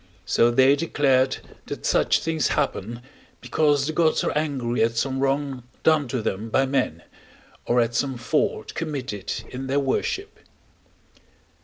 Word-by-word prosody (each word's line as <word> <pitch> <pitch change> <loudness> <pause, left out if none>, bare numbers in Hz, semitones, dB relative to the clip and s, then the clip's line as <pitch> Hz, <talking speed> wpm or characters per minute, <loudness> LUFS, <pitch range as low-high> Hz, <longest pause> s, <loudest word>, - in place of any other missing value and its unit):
so 115 - +3
they 130 +3 +5
declared 135 -4 +2 0.3
that - - -6
such - - +3
things 160 -4 0
happen, 115 +4 -2 0.4
because 145 -3 +1
the 155 - -2
gods 160 -1 +2
are - - -1
angry 135 -6 -1
at 115 +1 +2
some 130 +2 0
wrong 135 -1 0 0.2
done 155 -3 +3
to 120 -2 -3
them 105 +4 -3
by 135 +4 +2
men, 130 - -1 0.6
or 120 - +3
at 115 0 +1
some 130 +2 -1
fault 130 +6 -1
committed 135 - -4 0.2
in 130 +1 -5
their 140 +2 +1
worship. 145 - -2
135 Hz, 145 wpm, -24 LUFS, 120-145 Hz, 0.6 s, they